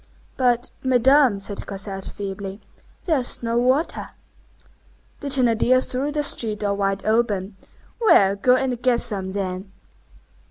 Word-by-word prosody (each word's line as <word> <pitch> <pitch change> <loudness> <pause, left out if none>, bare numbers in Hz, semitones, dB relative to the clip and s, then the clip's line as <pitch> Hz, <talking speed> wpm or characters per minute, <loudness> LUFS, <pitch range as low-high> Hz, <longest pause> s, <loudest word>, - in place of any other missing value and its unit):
"But, 245 -1 +1
Madame," 260 -2 +4
said 200 0 -6
Cosette, 195 -1 -6
feebly, 195 0 -6 0.5
"there 315 -6 +2
is 245 -1 -2
no 230 0 0
water." 260 +7 +1 1.1
The 285 - -6
Thénardier 255 -1 +2
threw 270 +3 -2
the 295 0 -1
street 215 -6 +1
door 200 -1 0
wide 195 -1 -2
open:— 215 -3 0 0.4
"Well, 200 - +4
go 250 +6 +3
and 255 -2 -2
get 245 -2 +2
some, 195 -5 -4
then!" 190 -1 -4
230 Hz, 130 wpm, -22 LUFS, 200-255 Hz, 1.1 s, Madame